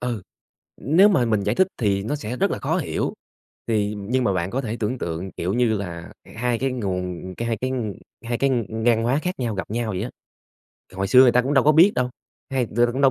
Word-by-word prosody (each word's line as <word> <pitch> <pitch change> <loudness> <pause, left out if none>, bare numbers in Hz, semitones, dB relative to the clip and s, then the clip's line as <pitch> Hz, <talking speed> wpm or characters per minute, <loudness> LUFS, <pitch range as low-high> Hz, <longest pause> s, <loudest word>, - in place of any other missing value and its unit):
Ừ. 120 -5 -3 0.6
Nếu 175 +10 +5
mà 145 -12 +3
mình 110 -3 +1
giải 105 +4 0
thích 190 - +4
thì 100 -4 +1
nó 145 +8 -2
sẽ 125 -3 -5
rất - - +1
là - - -3
khó - - 0
hiểu, - - -2 0.5
thì 105 -2 0
nhưng 125 +6 -1
mà 100 - +2
bạn 90 -1 -1
có 135 +3 -1
thể 115 -1 -4
tưởng 115 +4 -1
tượng, 85 +1 -4
kiểu 90 +3 -3
như 120 -1 +2
là, 85 -4 -6
h - - -17
hai 120 0 0
cái 135 +1 0
nguồn 95 -6 -4
cái 115 - -3
hai 115 -2 -1
cái 130 +3 -2
ng 115 -6 -2 0.3
hai 120 0 -1
cái, 140 - +2
ừm, 130 - +2
hai 115 - -4
cái 110 - -7
ngang 115 -1 +3
hoá 125 +5 +2
khác 180 -3 -3
nhau 115 -4 -2
gặp 95 - -4
nhau 115 +1 -2
vậy 95 - -3
á. 125 - -4 0.8
Hồi 95 +1 -2
xưa 125 +6 +7
người 130 -2 +7
ta 125 +1 +4
cũng 135 +3 -1
đâu 135 -3 +4
có 150 - +6
biết 170 +7 +6
đâu, 125 0 0 0.4
hay 130 -2 +1
đ - - -15
ta 120 - +6
cũng 130 - -2
đâu 135 - +6
120 Hz, 270 wpm, -23 LUFS, 100-130 Hz, 0.8 s, xưa